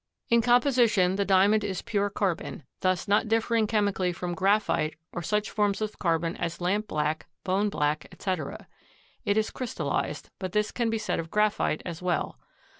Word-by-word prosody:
In 235 0 +6
composition 240 -6 +4
the 200 0 0
Diamond 200 +2 +4
is 195 -3 -3
pure 205 -1 0
carbon, 190 -6 -2 0.2
thus 185 -1 0
not 205 +2 +3
differing 225 0 +2
chemically 200 -4 +1
from 175 0 -4
graphite 190 -5 +1 0.2
or 175 - -3
such 210 +5 -1
forms 205 -2 +1
of 215 -1 -4
carbon 165 -1 0
as 170 0 -3
lamp 200 +4 0
black, 155 +1 -1 0.2
bone 195 +2 +1
black, 150 -4 -1
etc. 185 -7 -4 0.6
It 205 - +2
is 220 0 +1
crystallized, 255 -3 -3
but 185 -2 -4
this 210 0 +1
can 235 -2 0
be 225 - 0
said 220 - -2
of 165 0 -5
graphite 210 -6 +1
as 170 -1 -6
well. 175 - -1
200 Hz, 170 wpm, -27 LUFS, 175-215 Hz, 0.6 s, In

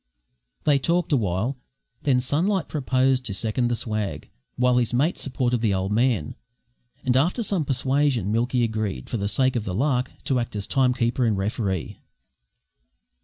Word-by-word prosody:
They 145 -2 +4
talked 170 +4 0
awhile; 115 +2 0 0.4
then 135 -3 +2
Sunlight 165 +8 0
proposed 130 -2 +1
to 100 - -3
second 115 +4 0
the 120 - 0
swag, 105 -9 -4 0.2
while 125 0 +3
his 120 0 0
mate 150 +8 +2
supported 125 -3 -1
the 105 -4 +2
old 95 +1 -2
man, 115 - +1 0.7
and 130 -2 +1
after 175 - +2
some 190 -7 +1
persuasion, 135 -5 +1
Milky 120 +2 +1
agreed, 110 - -3
for - - 0
the 100 -1 -1
sake 130 +6 +1
of 115 - 0
the 95 -3 -4
lark, 130 +1 +1
to 130 -2 +1
act 120 -2 -4
as 100 -1 -2
time 130 -2 +2
keeper 120 +1 0
and 110 -4 +2
referee. 95 -3 -2
125 Hz, 165 wpm, -24 LUFS, 110-135 Hz, 0.7 s, They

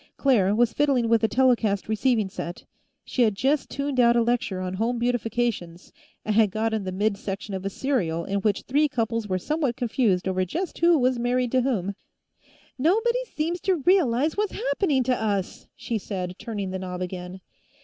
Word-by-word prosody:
Claire 210 -8 +3
was 235 0 +2
fiddling 275 -5 +2
with 230 -1 +3
a - - +5
telecast 225 -4 +2
receiving 220 -1 +1
set; 175 -2 -7 0.4
she 255 - -1
had 215 -4 +3
just 270 +6 0
tuned 280 -2 -2
out 235 -1 +5
a 235 - +4
lecture 230 -5 -1
on 185 0 -3
Home 230 +5 -1
Beautifications 230 -7 -2 0.3
and 215 - 0
had 220 -2 +5
gotten 220 0 -1
the 185 - -3
mid 200 +2 0
section 200 +1 -5
of 190 -1 -4
a - - 0
serial 185 -10 -1
in 200 +1 -1
which 200 0 0
three 295 +4 +2
couples 230 -4 -2
were 185 -2 0
somewhat 285 - -1
confused 225 -7 0
over 185 0 +1
just 340 - -4
who 335 0 +5
was 255 -2 +1
married 245 0 0
to 260 - +3
whom. 205 -7 -1 0.9
"Nobody 450 - +2
seems 335 +3 -1
to 380 - +2
realize 310 -6 +3
what's 415 -1 -1
happening 280 -1 0
to 250 +1 +1
us!" 205 -4 -2
she 230 -2 -3
said, 185 -3 -4
turning 205 -5 -4
the 190 - -3
knob 185 -1 -4
again. 180 0 -6
230 Hz, 185 wpm, -25 LUFS, 195-260 Hz, 0.9 s, a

